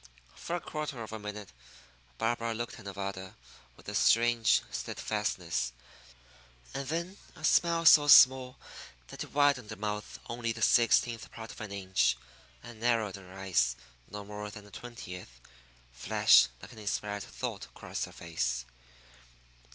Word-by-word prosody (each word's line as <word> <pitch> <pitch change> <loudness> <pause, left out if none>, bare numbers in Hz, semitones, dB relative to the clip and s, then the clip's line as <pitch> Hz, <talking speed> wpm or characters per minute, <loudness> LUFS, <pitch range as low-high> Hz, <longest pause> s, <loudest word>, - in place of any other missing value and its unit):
For 170 - -4
a - - -1
quarter 150 -7 -5
of 110 - -9
a 110 - -5
minute 105 -1 -7 0.7
Barbara 115 0 -1
looked 120 +1 -5
at - - -13
Nevada 100 -1 -6 0.4
with - - -18
a - - -4
strange 115 0 +4
steadfastness; 60 - -2 1.0
and 135 -1 -4
then 170 +6 -3 0.2
a 155 - -14
smile 170 +1 +3
so 150 -2 +8
small 130 -2 +7 0.5
that - - -6
it - - -12
widened 140 -6 +2
her 110 - -5
mouth 105 0 -4
only 115 -1 -2
the 110 0 -4
sixteenth 120 0 +3
part 110 -1 -9
of - - -11
an 105 -2 -6
inch, 95 -12 +1 0.5
and 120 -2 -11
narrowed 115 -4 +1
her 95 -1 -14
eyes 85 -11 +1 0.3
no 105 -1 -7
more 105 0 -6
than 105 0 -11
a 105 - -16
twentieth, 90 - -9 0.5
flashed - - +5 0.2
like - - -10
an 110 - -12
inspired 105 -1 -3
thought - - -5
across - - -5
her - - -13
face. 65 -8 -3
110 Hz, 150 wpm, -30 LUFS, 100-120 Hz, 1.0 s, so